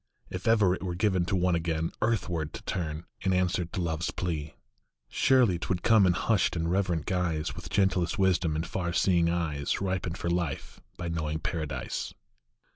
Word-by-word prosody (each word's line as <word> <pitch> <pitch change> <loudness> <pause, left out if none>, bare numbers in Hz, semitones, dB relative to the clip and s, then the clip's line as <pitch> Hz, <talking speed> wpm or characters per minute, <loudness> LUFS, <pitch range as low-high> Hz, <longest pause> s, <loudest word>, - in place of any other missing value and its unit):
If 90 +2 -5
ever 105 -5 +5
it - - -4
were 90 -2 -3
given 95 -2 +2
to 95 - -1
one 90 -1 +2
again 80 -1 -1
Earthward 90 -9 0
to - - -8
turn 80 -2 -3 0.2
in 95 -1 +1
answer 90 -1 +1
to 90 - -5
Love 80 -2 -2
s 85 - 0
plea, 75 -5 -3 0.5
Surely 120 -10 +3
t - - -5
would 90 -2 -1
come 110 -4 +6
in 90 - +4
hushed 95 0 +1
and 85 0 -1
reverent 90 -5 0
guise, 85 -4 -1
With - - -8
gentlest 95 -1 +1
wisdom 90 -5 +2
in 80 - -1
far 85 +1 -3
seeing 85 -2 +3
eyes, 80 -5 -1
Ripened 95 -2 -2
for 85 - -2
life 85 -5 -3 0.2
by 85 - -4
knowing 80 -2 -2
Paradise. 80 -2 -4
90 Hz, 185 wpm, -29 LUFS, 80-95 Hz, 0.5 s, come